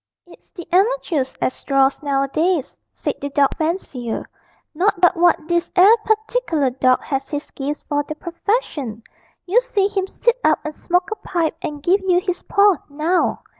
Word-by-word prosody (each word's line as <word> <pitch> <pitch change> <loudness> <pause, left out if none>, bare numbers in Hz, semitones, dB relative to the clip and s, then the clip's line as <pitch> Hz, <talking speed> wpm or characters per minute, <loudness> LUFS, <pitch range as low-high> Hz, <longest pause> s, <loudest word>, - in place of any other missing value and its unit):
'It's 350 - -19
the 350 -5 -10
amatoors 365 - +1
as 255 - -2
draws 275 -1 +2
nowadays,' 285 +3 0 0.2
said - - -3
the 285 - -3
dog 280 -1 +2
fancier: 310 -8 -3 0.5
'not 365 +4 +1
but 355 +1 +4
what 340 -2 +2
this 345 -1 0
'ere 390 +5 +7
partic'lar 435 - 0
dawg 255 -1 +4
has 270 -1 -3
his 290 0 -5
gifts 285 +1 -4
for 290 -1 0
the 305 +1 -6
purfession. 335 - -3 0.4
You 420 +7 +3
see 420 -6 0
him 390 -2 -2
sit 475 +5 0
up 310 - +4
and 305 - -4
smoke 360 +2 -1
a - - -1
pipe 335 -3 -2
and 295 -1 -6
give 370 +4 +3
yer 365 -2 +2
his 360 -1 -3
paw, 400 -3 +3
now.' 315 +5 0
340 Hz, 170 wpm, -20 LUFS, 285-385 Hz, 0.5 s, ere